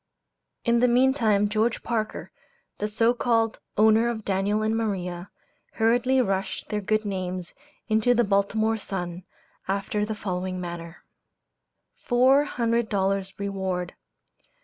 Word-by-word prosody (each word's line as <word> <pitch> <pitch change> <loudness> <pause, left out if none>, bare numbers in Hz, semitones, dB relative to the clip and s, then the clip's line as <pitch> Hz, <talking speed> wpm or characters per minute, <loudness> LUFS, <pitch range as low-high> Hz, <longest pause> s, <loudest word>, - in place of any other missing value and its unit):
In 235 -1 +3
the 250 - +4
meantime 240 -5 +3
George 220 +2 0
Parker, 220 -3 -3 0.5
the 210 - -1
so 225 +3 +2
called 230 -2 +1 0.2
owner 220 +2 +5
of 220 -3 -4
Daniel 200 +2 0
and 220 +1 +1
Maria, 185 -5 -3 0.4
hurriedly 245 +3 +2
rushed 195 -3 -2
their 210 0 -1
good 215 +2 0
names 185 -2 -4 0.3
into 220 +2 +3
the 240 - +4
"Baltimore 215 +2 +1
Sun," 180 -3 -5 0.4
after 200 +2 -1
the 215 +1 -3
following 185 -2 -3
manner 170 -1 -7 0.9
"FOUR 260 +4 +4
HUNDRED 235 -3 0
DOLLARS 195 -1 -1
REWARD. 190 -3 -3
210 Hz, 125 wpm, -25 LUFS, 190-230 Hz, 0.9 s, owner